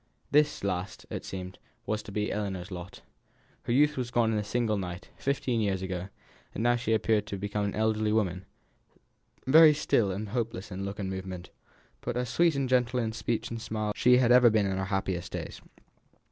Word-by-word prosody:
This 150 -4 +3
last, 95 -1 -3
it - - -4
seemed, 95 -1 -7 0.3
was 110 -1 -1
to 105 - -10
be 105 +1 -1
Ellinor's 95 -3 -3
lot. 90 +1 -8 0.6
Her - - -2
youth 145 +4 +4
had 125 -4 -4
gone 115 -2 +2
in 105 - +1
a - - -2
single 115 0 0
night, 90 -1 -6
fifteen 130 -4 -1
years 95 -3 0
ago, 95 0 -4 0.5
and 110 - -2
now 120 0 +4
she 115 -2 -1
appeared 110 -1 +1
to 100 - -4
have - - -7
become 105 +1 -2
an 100 - -3
elderly 110 0 +1
woman; 95 -4 0 1.0
very 155 +3 +8
still 115 -8 +2
and 100 +3 -4
hopeless 115 -3 -3
in 95 +1 -4
look 100 +1 -5
and 100 - -3
movement, 95 -1 -6 0.5
but - - -3
as 125 -1 -1
sweet 170 +1 +3
and 135 -1 0
gentle 125 -1 +2
in 115 -2 -1
speech 115 +1 -2
and 115 -1 -4
smile 110 -1 -3
as - - 0
ever - - -8
she 125 0 +6
had 125 -1 +6
been 105 -2 +3
in 95 -1 -1
her 95 - -1
happiest 95 -2 -2
days. - - -6
105 Hz, 205 wpm, -29 LUFS, 95-120 Hz, 1.0 s, very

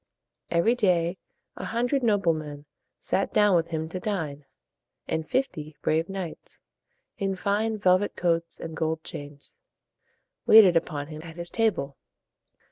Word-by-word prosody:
Every 170 +8 +3
day 180 -6 +1 0.4
a - - -6
hundred 245 +4 0
noble 205 -7 +3
men 150 -2 -7 0.3
sat 195 - 0
down 210 -3 +4
with 165 -1 +2
him 160 -1 -3
to 185 - -5
dine; 160 -8 -3 0.6
and 160 -1 -2
fifty 155 - -2
brave 160 +3 +1
knights, 190 -4 -7 0.6
in 195 -2 0
fine 210 +3 0
velvet 185 0 +2
coats 170 -1 0
and 160 -1 -6
gold 160 0 -1
chains, 145 - -9 0.9
waited 205 -5 +8
upon 155 -3 0
him 155 -1 -7
at 165 0 -10
his 170 0 -7
table. 190 -12 0
170 Hz, 135 wpm, -26 LUFS, 160-205 Hz, 0.9 s, waited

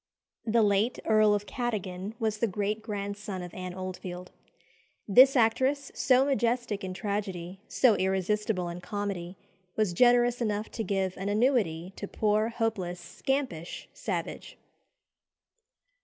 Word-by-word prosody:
The 225 0 +4
late 205 +4 +2
Earl 215 -1 +5
of 205 0 -3
Cadogan 205 -4 -3
was 220 -3 -1
the 230 - +2
great 210 +2 -2
grandson 200 -2 -5
of 175 - -9
Anne 185 -1 -6
Oldfield. 185 -1 -6 0.8
This 260 +7 +7
actress, 260 +4 +2
so 260 0 +4
majestic 240 -6 0
in 185 -1 -4
tragedy, 190 -3 -4
so 250 -4 +4
irresistible 190 0 0
in 175 +1 -6
comedy, 195 -3 -4 0.4
was 215 -5 +1
generous 245 +3 +4
enough 210 -1 -1
to 225 - -3
give 190 -3 -1
an 195 +2 -3
annuity 205 - +1
to 200 - -5
poor, 215 +2 +1
hopeless, 220 -7 -2
scampish 180 - -3
Savage. - - -5
205 Hz, 125 wpm, -29 LUFS, 185-230 Hz, 0.8 s, This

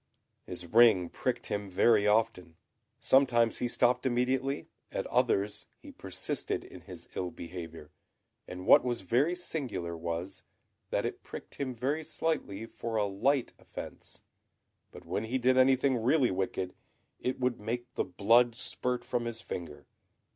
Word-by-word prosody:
His 90 -1 -6
ring 105 -3 +5
pricked - - -2
him 100 -1 -3
very 105 +3 +4
often. 105 -6 +1 0.4
Sometimes 120 -4 +4
he 125 - 0
stopped 125 +1 +2
immediately, 130 +2 0 0.3
at - - -2
others 100 +1 +1
he - - -12
persisted - - -3
in - - -12
his - - -11
ill 90 - -2
behaviour; 85 -2 -8 0.6
and 90 +1 -7
what - - +7
was 120 -3 -1
very 130 - +2
singular 130 - -4
was, 85 +3 -4 0.5
that - - 0
it - - -4
pricked - - -10
him 130 -2 -2
very 140 +7 -1
slightly 150 -10 -2
for 115 0 -5
a 105 -1 +2
light 120 +7 +1
offence, - - -10 0.7
but 90 - -12
when 95 +6 -2
he 125 +4 -1
did 130 0 +3
anything 130 -1 +4
really 130 +1 +3
wicked, 95 0 -2 0.5
it 130 +1 -2
would 125 -1 0
make 120 +3 -4
the - - 0
blood 115 +6 +4
spurt 125 0 -2
from 120 -1 -1
his 115 -1 -3
finger. 90 -6 -7
115 Hz, 145 wpm, -31 LUFS, 95-125 Hz, 0.7 s, what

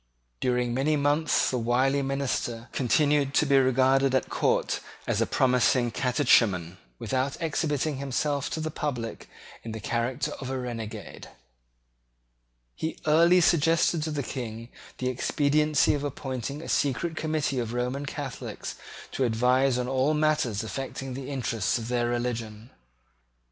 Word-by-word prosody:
During 125 -1 0
many 140 +5 +1
months 145 +2 +2
the 125 - 0
wily 130 +4 +2
minister 135 -4 -2
continued 140 +2 +2
to - - +4
be 140 -1 +4
regarded 130 +1 +3
at 130 - 0
court - - +1 0.3
as - - 0
a - - +2
promising 125 -1 +2
catechumen, 110 - +2 0.2
without 130 - -2
exhibiting 155 -3 -1
himself 140 +1 -1
to - - -3
the 155 0 -3
public 125 -7 -4 0.3
in 115 - -7
the 110 - -5
character 120 +5 -2
of 130 - -5
a 135 - -2
renegade. 120 -4 -6 1.4
He 160 - -4
early 170 +4 +5
suggested 165 0 +3
to 160 - -2
the 145 -2 -2
King 115 -2 -6 0.3
the 130 - -2
expediency 145 +3 +2
of 145 -1 -2
appointing 140 +1 -4
a - - -8
secret 155 +4 0
committee 155 -4 -1
of 115 -2 -3
Roman 125 +4 -2
Catholics 140 -3 -6 0.3
to 135 - -1
advise 125 +2 +2
on 125 0 -1
all 135 +4 +1
matters 150 -9 +1
affecting 135 +4 -5
the 135 +1 -6
interests 115 -7 -1
of 115 0 -6
their 120 -1 +1
religion. 120 -2 -3
130 Hz, 140 wpm, -27 LUFS, 120-145 Hz, 1.4 s, early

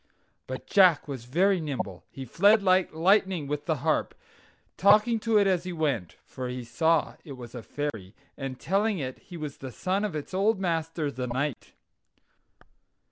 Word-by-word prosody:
But - - -6
Jack 185 -7 +4
was 130 -5 -6
very 185 +9 +2
nimble. 125 - -4
He 135 - -8
fled 200 - +4
like 185 -1 +3
lightning 185 0 +2
with 145 +2 -4
the 160 - +2
harp, 155 - +1 0.6
talking 210 +4 +4
to 225 0 +2
it 205 - +4
as 185 -3 +2
he 180 - -5
went 140 - -1
(for 130 -1 -6
he 125 0 -5
saw 160 +8 +1
it 140 - -9
was 120 -3 -10
a 120 - -6
fairy), 110 -8 -5 0.2
and 135 -2 -6
telling 200 +3 +1
it 130 -5 -5
he 175 - -11
was 150 -3 -6
the 130 -1 -8
son 190 - -1
of 205 -6 -2
its 150 +4 -6
old 200 +2 +2
master, 165 -4 -1
the 125 -1 -4
knight. 130 +2 -3
160 Hz, 175 wpm, -27 LUFS, 130-190 Hz, 0.6 s, Jack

